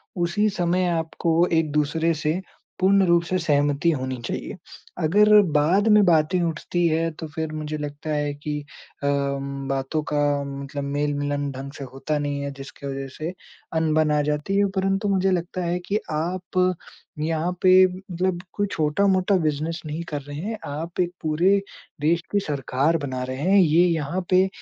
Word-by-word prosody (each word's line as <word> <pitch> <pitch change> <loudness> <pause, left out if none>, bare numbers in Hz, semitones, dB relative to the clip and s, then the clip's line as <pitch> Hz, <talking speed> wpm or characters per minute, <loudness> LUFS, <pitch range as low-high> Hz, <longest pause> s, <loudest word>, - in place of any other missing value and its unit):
उसी 180 +5 +1
समय 180 +1 +2
आपको 165 +1 +1
एक-दूसरे 155 +2 +1
से 160 +5 0 0.4
पूर्ण 195 +1 +4
रूप 170 -1 +4
से 185 +2 -1
सहमति 145 -1 +2
होनी 130 -3 -3
चाहिए, - - -4 0.4
अगर 210 +6 +6 0.2
बाद 185 +8 +3
में 210 -1 +6
बातें 170 +1 +3
उठती 170 +1 -1
हैं, 165 +1 +1
तो 160 0 -7
फिर 160 -1 -2
मुझे 155 0 -4
लगता 145 +1 -6
है 145 -1 0
कि 150 +1 -4 0.5
अम, 140 -1 -1
बातों 135 +3 -1
का 145 0 +2 0.2
मतलब 140 0 -5
मेल-मिलन 145 0 -1
ढंग 135 +1 -7
से 140 - -6
होता 150 +3 -2
नहीं 145 -1 -2
है, 140 - -3
जिसके 135 0 -9
वजह 135 0 -4
से 160 +3 -4 0.4
अनबन 155 -1 +2
आ 150 0 +3
जाती 150 +6 -1
है। 205 - +4
परंतु 195 +2 0
मुझे 190 0 +2
लगता 180 0 -2
है 175 +1 0
कि 210 +2 +1
आप 180 +3 0 0.5
यहाँ 160 +2 0
पे 185 0 +7
मतलब 185 -1 -3
कोई 205 0 0
छोटा-मोटा 185 +5 +2
बिज़नेस 160 +1 -1
नहीं 155 +2 -4
कर 145 -2 -3
रहे 145 +1 -9
हैं। 215 +6 -4
आप 160 +5 -5
एक 175 -1 +1
पूरे 175 +6 +3 0.4
देश 165 +3 +2
की 205 - +3
सरकार 145 -1 0
बना 130 -4 -4
रहे 130 0 -4
हैं, 190 +5 +4
ये 170 0 +5
यहाँ 165 +1 -1
पे 185 +1 +5
160 Hz, 165 wpm, -24 LUFS, 145-180 Hz, 0.5 s, पे